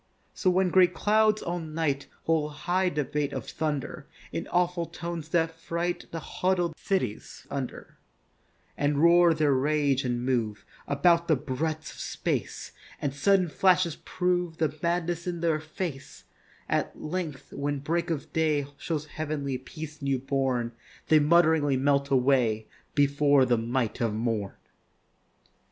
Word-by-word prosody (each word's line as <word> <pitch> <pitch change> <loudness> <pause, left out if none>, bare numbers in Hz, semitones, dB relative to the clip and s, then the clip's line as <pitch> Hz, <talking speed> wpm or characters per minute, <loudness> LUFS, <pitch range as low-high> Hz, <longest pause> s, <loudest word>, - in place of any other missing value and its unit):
So 185 - +1
when 185 0 +3
great 180 -1 +5
clouds 215 0 +3
all 175 +1 -2
night 155 -3 -2 0.2
Hold 155 -2 0
high 185 +1 +2
debate 145 -1 -2
of - - -5
thunder 150 -4 -3 0.2
In - - -4
awful 175 -1 0
tones 170 -2 -6
that 165 -1 +2
fright 170 +2 -3
The 165 - -5
huddled 175 0 -1
cities 140 - -3
under; 135 -3 -6 0.8
And 145 0 +1
roar 170 0 +6
their 150 -3 +3
rage 140 0 +2
and 120 -1 -1
move 115 -5 -1 0.2
About 170 +4 +3
the 160 - +4
breadths 155 +3 -3
of - - -13
space, - - -3 0.3
And 140 -2 -2
sudden 185 +5 +3
flashes 180 -1 +3
prove 180 -2 -1
The 155 -2 0
madness 170 0 -1
in 175 -1 -2
their 165 -2 +2
face; 155 -2 -6 0.4
At - - -1
length, 155 -3 -5
when 145 0 -2
break 165 +5 -1
of 160 -4 -4
day 155 -3 +1
Shows 155 -3 -3
heav'nly 145 -4 -3
peace 155 +3 -9
newborn, 135 -3 0 0.4
They 155 - +7
muttering 150 -3 +3
melt 140 0 +2
away 125 -5 +2 0.3
Before 145 -1 +4
the 120 -2 +2
might 120 +1 -1
of 115 -3 0
morn. 110 -3 -2
155 Hz, 140 wpm, -27 LUFS, 140-170 Hz, 0.8 s, They